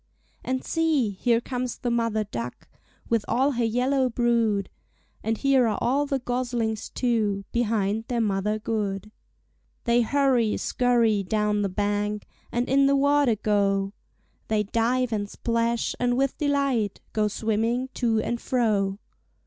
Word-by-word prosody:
And 260 Hz, 0 st, -2 dB
see! 310 Hz, -9 st, +1 dB
here 230 Hz, +4 st, +1 dB
comes 250 Hz, 0 st, -4 dB
the 245 Hz, -3 st, -2 dB
mother 230 Hz, -2 st, +1 dB
duck 125 Hz, -, -6 dB, 0.4 s
With 230 Hz, -3 st, +1 dB
all 265 Hz, +5 st, +2 dB
her 240 Hz, -3 st, -1 dB
yellow 255 Hz, +3 st, +1 dB
brood; 230 Hz, -4 st, +1 dB, 0.6 s
And 225 Hz, 0 st, 0 dB
here 270 Hz, -2 st, +3 dB
are 215 Hz, -, 0 dB
all 275 Hz, +4 st, +1 dB
the 275 Hz, -, 0 dB
goslings, 245 Hz, -3 st, -2 dB
too, 215 Hz, -5 st, 0 dB
Behind 220 Hz, -2 st, 0 dB
their 240 Hz, -2 st, -1 dB
mother 210 Hz, -1 st, 0 dB
good. 210 Hz, -2 st, -3 dB, 0.7 s
They 235 Hz, 0 st, +3 dB
hurry, 250 Hz, -3 st, +2 dB
scurry, 235 Hz, -4 st, +2 dB
down 210 Hz, +1 st, 0 dB
the 200 Hz, -, 0 dB
bank 205 Hz, +2 st, -1 dB, 0.3 s
And 240 Hz, +1 st, -1 dB
in 275 Hz, +1 st, +4 dB
the 280 Hz, -, +4 dB
water 285 Hz, -3 st, +3 dB
go. 200 Hz, -2 st, +1 dB, 0.5 s
They 215 Hz, -1 st, +1 dB
dive 230 Hz, +3 st, 0 dB
and 205 Hz, -1 st, -2 dB
splash, 230 Hz, +1 st, -1 dB
and 245 Hz, 0 st, +1 dB
with 270 Hz, 0 st, +1 dB
delight 275 Hz, -8 st, 0 dB
Go 215 Hz, -1 st, +2 dB
swimming 225 Hz, +4 st, -1 dB
to 230 Hz, -3 st, +1 dB
and 235 Hz, 0 st, -2 dB
fro. 205 Hz, -6 st, +1 dB
230 Hz, 140 wpm, -25 LUFS, 210-250 Hz, 0.7 s, in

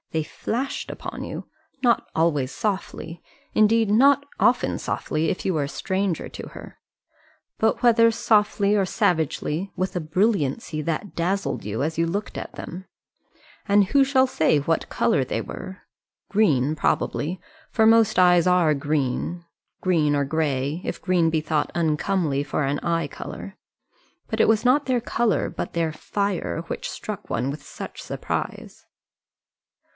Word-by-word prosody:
They 160 Hz, -1 st, 0 dB
flashed 255 Hz, -, -3 dB
upon -, -, -6 dB
you -, -, -6 dB, 0.4 s
not 240 Hz, -2 st, +3 dB
always 150 Hz, -5 st, +1 dB
softly; 185 Hz, -5 st, -4 dB, 0.3 s
indeed 220 Hz, 0 st, +4 dB
not 275 Hz, +6 st, +5 dB, 0.2 s
often -, -, +3 dB
softly, 155 Hz, +1 st, -1 dB
if 185 Hz, -, -3 dB
you 190 Hz, -, +1 dB
were 155 Hz, -3 st, 0 dB
a -, -, -6 dB
stranger 190 Hz, 0 st, -2 dB
to -, -, -9 dB
her; -, -, -12 dB, 0.8 s
but 220 Hz, 0 st, +2 dB
whether 230 Hz, -1 st, +6 dB
softly 210 Hz, -2 st, +2 dB
or 200 Hz, -, +3 dB
savagely, 165 Hz, 0 st, 0 dB
with 185 Hz, +1 st, -2 dB
a 180 Hz, -, 0 dB
brilliancy 155 Hz, -, 0 dB
that 165 Hz, +5 st, -3 dB
dazzled 190 Hz, +4 st, -1 dB
you 105 Hz, +4 st, -3 dB
as 155 Hz, +1 st, -2 dB
you 165 Hz, -, +2 dB
looked 200 Hz, +5 st, -3 dB
at -, -, -6 dB
them. 185 Hz, +2 st, -8 dB, 0.8 s
And 205 Hz, -1 st, +5 dB
who 275 Hz, +8 st, +4 dB
shall 265 Hz, -1 st, +3 dB
say 155 Hz, -10 st, +2 dB
of 145 Hz, -, -3 dB
what 165 Hz, -, 0 dB
colour 135 Hz, -, +2 dB
they 120 Hz, -, -2 dB
were? 185 Hz, +10 st, -8 dB, 0.5 s
Green 155 Hz, -, +2 dB
probably, 160 Hz, +3 st, -1 dB, 0.3 s
for 220 Hz, -, +3 dB
most 225 Hz, -3 st, +5 dB
eyes 180 Hz, -1 st, +5 dB
are 180 Hz, -4 st, +4 dB
green 145 Hz, +4 st, -2 dB, 0.3 s
green 160 Hz, -5 st, +2 dB
or 145 Hz, -1 st, +1 dB
grey, 145 Hz, +1 st, -1 dB
if -, -, -4 dB
green 180 Hz, -3 st, +2 dB
be 160 Hz, -1 st, +1 dB
thought 155 Hz, -1 st, -1 dB
uncomely 155 Hz, -2 st, +1 dB
for 145 Hz, +1 st, -2 dB
an 140 Hz, +1 st, 0 dB
eye 165 Hz, -1 st, 0 dB
colour. -, -, -8 dB, 0.7 s
But 220 Hz, 0 st, 0 dB
it -, -, +4 dB
was 225 Hz, +1 st, +2 dB
not 270 Hz, +3 st, +3 dB
their 255 Hz, -2 st, +2 dB
colour, 230 Hz, -2 st, 0 dB
but -, -, -5 dB
their 165 Hz, -2 st, -1 dB
fire, 200 Hz, -1 st, -2 dB
which -, -, -4 dB
struck 205 Hz, -3 st, -6 dB
one 125 Hz, +4 st, -1 dB
with 145 Hz, +1 st, -6 dB
such -, -, -8 dB
surprise. -, -, -5 dB
175 Hz, 155 wpm, -24 LUFS, 155-210 Hz, 0.8 s, whether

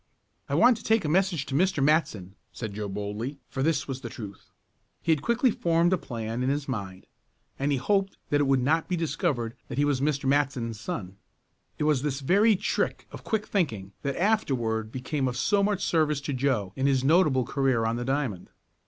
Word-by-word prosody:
"I -, -, 0 dB
want 245 Hz, -2 st, +5 dB
to 225 Hz, -, -12 dB
take 220 Hz, -5 st, +2 dB
a -, -, 0 dB
message 175 Hz, -2 st, +1 dB
to -, -, -7 dB
Mr. 165 Hz, -1 st, +2 dB
Matson," 125 Hz, -, +1 dB, 0.2 s
said 110 Hz, -4 st, -6 dB
Joe 105 Hz, 0 st, -4 dB
boldly, 105 Hz, +7 st, -4 dB
for 135 Hz, -, -4 dB
this 150 Hz, 0 st, +1 dB
was 135 Hz, -1 st, -5 dB
the -, -, -6 dB
truth. 100 Hz, -5 st, -9 dB, 0.5 s
He 165 Hz, -, 0 dB
had 155 Hz, -3 st, +2 dB
quickly 235 Hz, -, +2 dB
formed 170 Hz, -1 st, +2 dB
a -, -, +3 dB
plan 115 Hz, 0 st, -4 dB
in 130 Hz, -, +1 dB
his 140 Hz, 0 st, -1 dB
mind, 100 Hz, -7 st, -5 dB, 0.5 s
and 140 Hz, +2 st, 0 dB
he 140 Hz, -, +2 dB
hoped 195 Hz, +7 st, 0 dB
that 145 Hz, 0 st, +3 dB
it 145 Hz, -, +2 dB
would 135 Hz, -2 st, +3 dB
not 160 Hz, +4 st, +2 dB
be 180 Hz, -, +1 dB
discovered 150 Hz, -7 st, -1 dB
that 120 Hz, -, -6 dB
he 145 Hz, -, +3 dB
was 140 Hz, -3 st, +1 dB
Mr. 140 Hz, -1 st, 0 dB
Matson's 135 Hz, -5 st, 0 dB
son. 100 Hz, -, -5 dB, 0.6 s
It -, -, -1 dB
was 150 Hz, -4 st, +2 dB
this 140 Hz, -1 st, -2 dB
very 205 Hz, +9 st, +4 dB
trick -, -, -1 dB
of -, -, -10 dB
quick 220 Hz, -2 st, -1 dB
thinking 110 Hz, -, -1 dB
that 140 Hz, -1 st, -2 dB
afterward 120 Hz, -, 0 dB
became 130 Hz, +2 st, -2 dB
of 125 Hz, -1 st, -3 dB
so 200 Hz, +10 st, +2 dB
much 200 Hz, -1 st, 0 dB
service 155 Hz, -3 st, +2 dB
to 140 Hz, 0 st, -3 dB
Joe 125 Hz, -8 st, 0 dB
in 135 Hz, +1 st, +1 dB
his 135 Hz, -2 st, +2 dB
notable 150 Hz, -4 st, +4 dB
career 130 Hz, -3 st, +1 dB
on 115 Hz, +1 st, 0 dB
the 120 Hz, -, -3 dB
diamond. 135 Hz, -9 st, -2 dB
140 Hz, 205 wpm, -27 LUFS, 120-165 Hz, 0.6 s, want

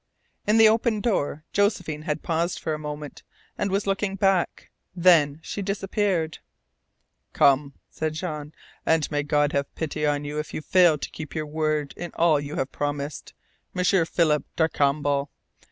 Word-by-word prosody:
In 210 Hz, +2 st, +4 dB
the 225 Hz, -1 st, +8 dB
open 225 Hz, 0 st, +2 dB
door 155 Hz, -9 st, -1 dB
Josephine 180 Hz, -7 st, 0 dB
had 155 Hz, 0 st, -3 dB
paused 170 Hz, +1 st, 0 dB
for 160 Hz, -, -3 dB
a 155 Hz, -, -4 dB
moment, 150 Hz, -1 st, -7 dB, 0.3 s
and 200 Hz, -, -1 dB
was 195 Hz, +1 st, 0 dB
looking 195 Hz, 0 st, -1 dB
back. 195 Hz, -2 st, 0 dB, 0.2 s
Then 165 Hz, -5 st, +4 dB
she 205 Hz, -, -4 dB
disappeared. 195 Hz, -4 st, -1 dB, 0.9 s
"Come," 140 Hz, 0 st, +3 dB, 0.2 s
said 155 Hz, -1 st, -3 dB
Jean. 150 Hz, -3 st, -5 dB, 0.3 s
"And 160 Hz, -1 st, +1 dB
may 145 Hz, -1 st, +1 dB
God 145 Hz, 0 st, +1 dB
have 140 Hz, 0 st, -2 dB
pity 150 Hz, -1 st, -2 dB
on 145 Hz, 0 st, 0 dB
you 150 Hz, +1 st, -3 dB
if 150 Hz, -, -5 dB
you -, -, -3 dB
fail 175 Hz, -4 st, +5 dB
to -, -, -6 dB
keep 150 Hz, -, -8 dB
your 155 Hz, -1 st, -2 dB
word 155 Hz, -1 st, -1 dB
in 175 Hz, -, -6 dB
all 165 Hz, -3 st, +4 dB
you 145 Hz, +1 st, -6 dB
have 135 Hz, -, -2 dB
promised, 145 Hz, 0 st, -4 dB, 0.4 s
M'sieur 180 Hz, -1 st, +3 dB
Philip 155 Hz, -4 st, +2 dB
Darcambal. 145 Hz, -3 st, +1 dB
155 Hz, 160 wpm, -25 LUFS, 145-185 Hz, 0.9 s, the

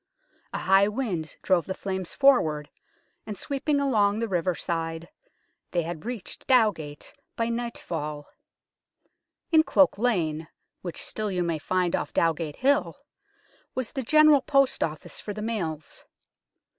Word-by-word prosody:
A -, -, -3 dB
high 195 Hz, +1 st, +4 dB
wind 205 Hz, -9 st, -3 dB
drove 185 Hz, -3 st, +2 dB
the 190 Hz, -, -3 dB
flames 190 Hz, -2 st, -4 dB
forward, 160 Hz, -, +3 dB, 0.6 s
and 210 Hz, -2 st, -5 dB
sweeping 285 Hz, +1 st, -1 dB
along 215 Hz, -7 st, +2 dB
the 230 Hz, +1 st, -1 dB
riverside 170 Hz, -3 st, -2 dB, 0.6 s
they 175 Hz, -1 st, 0 dB
had 165 Hz, +2 st, -6 dB
reached 240 Hz, -5 st, -6 dB
Dowgate 200 Hz, -, +1 dB, 0.2 s
by 230 Hz, 0 st, 0 dB
nightfall. 165 Hz, -11 st, -4 dB, 1.3 s
In 320 Hz, -1 st, +7 dB
Cloak 290 Hz, -8 st, +3 dB
Lane, 165 Hz, -10 st, 0 dB, 0.3 s
which 175 Hz, -2 st, -6 dB
still 215 Hz, -1 st, -3 dB
you 180 Hz, -2 st, 0 dB
may 165 Hz, -2 st, -1 dB
find 180 Hz, +2 st, 0 dB
off -, -, -4 dB
Dowgate 165 Hz, -2 st, 0 dB
Hill, 280 Hz, +3 st, +1 dB, 0.8 s
was 255 Hz, -3 st, -3 dB
the 270 Hz, -, -3 dB
General 305 Hz, +2 st, +6 dB
Post 275 Hz, -1 st, +2 dB
Office 155 Hz, -1 st, -5 dB
for 205 Hz, -, -6 dB
the 210 Hz, -, -5 dB
mails. 165 Hz, -10 st, -4 dB
195 Hz, 130 wpm, -26 LUFS, 165-245 Hz, 1.3 s, In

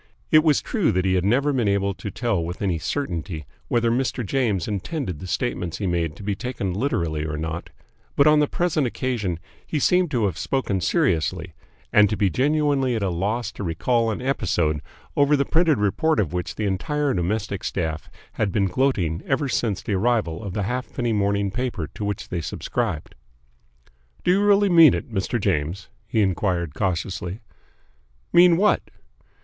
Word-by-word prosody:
It 155 Hz, 0 st, +7 dB
was 155 Hz, -3 st, +3 dB
true 215 Hz, -9 st, +1 dB
that 90 Hz, +1 st, +1 dB
he 95 Hz, -, +2 dB
had 90 Hz, -1 st, +2 dB
never 135 Hz, +8 st, +2 dB
been 120 Hz, -5 st, +1 dB
able 100 Hz, 0 st, +1 dB
to 90 Hz, +3 st, -6 dB
tell 110 Hz, -6 st, -1 dB
with 85 Hz, +2 st, -5 dB
any 90 Hz, -5 st, 0 dB
certainty 85 Hz, -, -3 dB, 0.2 s
whether 120 Hz, -1 st, +2 dB
Mr. 125 Hz, -1 st, -1 dB
James 105 Hz, -6 st, 0 dB
intended 105 Hz, -, -3 dB
the 95 Hz, -, -7 dB
statements 85 Hz, +1 st, -2 dB
he 100 Hz, -, -3 dB
made 85 Hz, -3 st, -1 dB
to 100 Hz, -, -11 dB
be 100 Hz, 0 st, -1 dB
taken 100 Hz, -4 st, -3 dB
literally 85 Hz, -, -1 dB
or 75 Hz, -1 st, -3 dB
not, 80 Hz, +2 st, -4 dB, 0.5 s
but 140 Hz, -, +5 dB
on 150 Hz, 0 st, +6 dB
the 150 Hz, -, +3 dB
present 155 Hz, -5 st, 0 dB
occasion 115 Hz, -8 st, -2 dB, 0.3 s
he 155 Hz, -, -3 dB
seemed 180 Hz, +4 st, +3 dB
to 120 Hz, -6 st, +1 dB
have 95 Hz, -5 st, -2 dB
spoken 105 Hz, -8 st, -1 dB
seriously 80 Hz, -1 st, 0 dB, 0.4 s
and 105 Hz, -1 st, +6 dB
to 105 Hz, -, -1 dB
be 100 Hz, -3 st, +2 dB
genuinely 140 Hz, -2 st, +1 dB
at 110 Hz, -, -1 dB
a 95 Hz, -, 0 dB
loss 105 Hz, +6 st, -1 dB
to 105 Hz, -, -7 dB
recall 115 Hz, +7 st, +1 dB
an 110 Hz, +3 st, -3 dB
episode 80 Hz, -, 0 dB, 0.3 s
over 145 Hz, +1 st, +4 dB
the 140 Hz, -, +1 dB
printed 165 Hz, -4 st, +3 dB
report 150 Hz, -, +1 dB
of 90 Hz, -7 st, 0 dB
which 90 Hz, -1 st, -3 dB
the 110 Hz, -, -2 dB
entire 140 Hz, +9 st, 0 dB
domestic 100 Hz, +2 st, -2 dB
staff 80 Hz, -3 st, -3 dB, 0.2 s
had 100 Hz, -3 st, -1 dB
been 100 Hz, 0 st, +1 dB
gloating 95 Hz, -, 0 dB
ever 135 Hz, +1 st, +1 dB
since 110 Hz, -6 st, -1 dB
the 105 Hz, -, -2 dB
arrival 100 Hz, -5 st, +1 dB
of 100 Hz, -3 st, -5 dB
the 105 Hz, -, -1 dB
halfpenny 120 Hz, +1 st, -2 dB
morning 100 Hz, -1 st, +1 dB
paper 120 Hz, -7 st, -2 dB
to -, -, -6 dB
which 100 Hz, -1 st, -3 dB
they 85 Hz, -2 st, -2 dB
subscribed. 90 Hz, 0 st, -3 dB, 1.1 s
"Do -, -, +3 dB
you 195 Hz, +2 st, +3 dB
really 205 Hz, 0 st, +5 dB
mean 165 Hz, -4 st, +7 dB
it, 120 Hz, -, -6 dB
Mr. 100 Hz, +4 st, -1 dB
James?" 90 Hz, -1 st, -1 dB, 0.2 s
he 110 Hz, -1 st, +1 dB
enquired 90 Hz, -4 st, 0 dB
cautiously. 90 Hz, +1 st, -2 dB, 0.9 s
"Mean 175 Hz, -1 st, +7 dB
what?" 210 Hz, +3 st, +3 dB
105 Hz, 180 wpm, -23 LUFS, 90-135 Hz, 1.1 s, It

